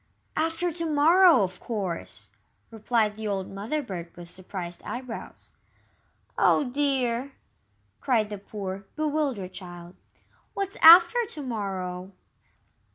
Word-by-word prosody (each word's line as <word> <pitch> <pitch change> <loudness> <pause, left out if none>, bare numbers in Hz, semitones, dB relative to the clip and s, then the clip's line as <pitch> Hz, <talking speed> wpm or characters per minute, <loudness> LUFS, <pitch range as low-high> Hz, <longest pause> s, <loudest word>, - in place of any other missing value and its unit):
"After 330 +2 -1
to 335 0 -3
morrow, 320 - +6
of 185 -1 -4
course!" 195 -7 -5 0.4
replied 220 -1 0
the 220 0 -6
old 195 -2 -3
Mother 220 +10 -3
bird, 175 -7 -7
with 175 0 -9
surprised 180 -1 -7
eyebrows. 245 -2 -8 0.9
"Oh, - - +4
dear!" 265 -1 0 0.7
cried 220 -5 +1
the 205 - -5
poor, 195 -1 -6
bewildered 290 -11 -2
child, 175 -1 -9 0.6
"what's 395 0 -3
after 345 +8 +8
to 295 - -7
morrow?" 190 -5 -4
225 Hz, 110 wpm, -26 LUFS, 190-295 Hz, 0.9 s, after